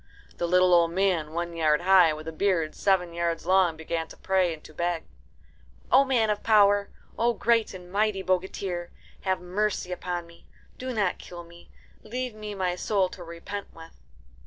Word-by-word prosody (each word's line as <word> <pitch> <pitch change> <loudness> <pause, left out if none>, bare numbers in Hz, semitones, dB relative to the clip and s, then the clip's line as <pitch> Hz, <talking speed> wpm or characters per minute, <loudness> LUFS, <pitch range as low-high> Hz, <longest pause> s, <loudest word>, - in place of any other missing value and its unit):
The 175 - -1
little 180 +1 +4
old 170 -1 +5
man, 175 -4 0
one 170 +1 -3
yard 155 -2 +2
high, 185 -2 +6
with 155 +1 -7
a - - -3
beard 165 -2 0
seven 180 -3 +1
yards 170 -1 -2
long, 185 -3 +3
began 160 0 -3
to - - -14
pray 190 -2 +1
and 160 -2 -8
to 155 - -14
beg, 170 0 -2 0.9
"O 270 - +7
man 240 -5 +2
of 210 - -2
power, 205 -2 +4 0.3
O 235 +1 +3
great 230 -3 +1
and 180 -1 -11
mighty 205 -1 0
bogatir, 185 -1 -2 0.4
have 190 -1 +1
mercy 185 +1 -2
upon 175 -1 -4
me. 170 0 -19 0.3
Do 255 0 -4
not 205 -6 0
kill 175 -1 -9
me. 170 0 -16 0.3
Leave 250 +2 -4
me 210 -1 -7
my 185 -2 -1
soul 190 0 0
to 180 - -10
repent 170 +4 -8
with." 165 - -14
180 Hz, 180 wpm, -27 LUFS, 170-200 Hz, 0.9 s, O